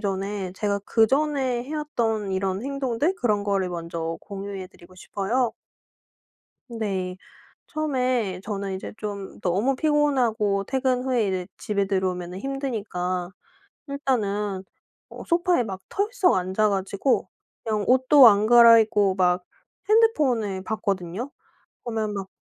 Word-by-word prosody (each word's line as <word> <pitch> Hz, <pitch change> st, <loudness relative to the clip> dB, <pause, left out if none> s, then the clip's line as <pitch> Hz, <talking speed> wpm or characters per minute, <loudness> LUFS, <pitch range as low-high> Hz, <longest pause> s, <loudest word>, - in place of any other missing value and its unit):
전에 195 Hz, -1 st, -3 dB
제가 200 Hz, +1 st, -1 dB
그전에 260 Hz, +3 st, +1 dB
해왔던 235 Hz, -9 st, -2 dB
이런 190 Hz, +2 st, -1 dB
행동들 275 Hz, +4 st, -1 dB
그런 210 Hz, -4 st, +1 dB
거를 195 Hz, -2 st, 0 dB
먼저 165 Hz, -1 st, -4 dB
공유해 195 Hz, -1 st, -7 dB
드리고 180 Hz, 0 st, -18 dB
싶어요. 225 Hz, +7 st, -1 dB, 1.2 s
네. 195 Hz, -6 st, -3 dB, 0.5 s
처음에 255 Hz, -10 st, -1 dB
저는 200 Hz, -2 st, -4 dB
이제 190 Hz, -, -6 dB
좀 205 Hz, -3 st, -6 dB
너무 205 Hz, +10 st, +1 dB
피곤하고 250 Hz, -10 st, +1 dB
퇴근 260 Hz, +1 st, 0 dB
후에 245 Hz, -5 st, +1 dB
이제 185 Hz, -1 st, -2 dB
집에 200 Hz, -2 st, -1 dB
들어오면은 185 Hz, -2 st, -2 dB
힘드니까 200 Hz, -9 st, -3 dB, 0.6 s
일단은 210 Hz, -8 st, -1 dB, 0.5 s
어 -, -, -9 dB
소파에 345 Hz, -4 st, +2 dB
막 195 Hz, -4 st, -6 dB
털썩 410 Hz, -2 st, +1 dB
앉아 190 Hz, +4 st, +1 dB
가지고 200 Hz, +6 st, 0 dB, 0.4 s
그냥 215 Hz, -2 st, -1 dB
옷도 260 Hz, +1 st, +7 dB
안 210 Hz, 0 st, +4 dB
갈아입고 225 Hz, -4 st, +6 dB
막 180 Hz, -1 st, +2 dB, 0.5 s
핸드폰을 260 Hz, -, +2 dB
봤거든요. 200 Hz, +3 st, -3 dB, 0.5 s
보면 220 Hz, -3 st, -2 dB
막 195 Hz, -1 st, -5 dB
210 Hz, 260 characters per minute, -24 LUFS, 190-255 Hz, 1.2 s, 옷도